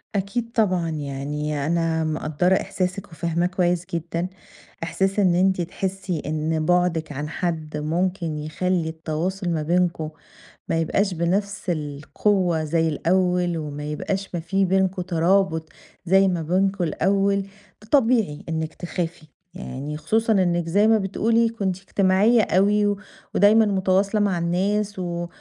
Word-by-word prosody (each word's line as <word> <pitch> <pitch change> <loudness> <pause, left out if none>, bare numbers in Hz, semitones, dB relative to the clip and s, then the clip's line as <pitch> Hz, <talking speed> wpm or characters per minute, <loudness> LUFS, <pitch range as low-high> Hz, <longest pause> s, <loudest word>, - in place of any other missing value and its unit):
أكيد 230 +4 -2
طبعًا، 185 -8 +1
يعني 145 0 -3
أنا 165 0 +1
مقدرة 155 +4 +1
إحساسك 185 +1 -2
وفاهماه 170 +2 -1
كويس 180 -1 0
جدًا، 170 +1 -2 0.6
إحساس 195 +4 0
إن 180 -3 +4
أنتِ 185 0 +2
تحسي 185 -1 -3
إن 155 +1 -1
بُعدك 175 -3 +1
عن 145 +2 -4
حد 160 -4 -3
ممكن 170 +1 -1
يخلي 160 +2 -1
التواصل 170 +4 -3
ما 160 -2 0
بينكم 170 -2 0 0.6
ما 165 - 0
يبقاش 195 +4 +1
بنفس 195 +4 -1
القوة 160 +3 0
زي 165 +1 +1
الأول 180 +2 +1
وما 150 -1 -5
يبقاش 190 +6 -3
ما - - -1
في 195 +4 0
بينكم 190 0 +1
ترابط 175 -1 +1 0.4
زي 190 +2 +5
ما 175 -3 0
بينكم 190 +3 +1
الأول، 195 +4 +1 0.4
طبيعي 230 - +2
إنك 160 -1 -2
تخافي 170 -2 -5 0.3
يعني 150 -4 -6
خصوصًا 220 +6 +1
إنك 175 -3 +1
زي 205 +5 +4
ما 225 0 +5
بتقولي 225 +4 +1
كنتِ 195 -5 -2
اجتماعية 195 +4 +3
أوي 205 +2 +3
و 205 -1 0 0.4
ودايمًا 215 +2 +6
متواصلة 195 +1 +1
مع 195 -4 +1
الناس 195 +4 0
و 175 -1 -3
180 Hz, 130 wpm, -23 LUFS, 160-195 Hz, 0.6 s, ودايمًا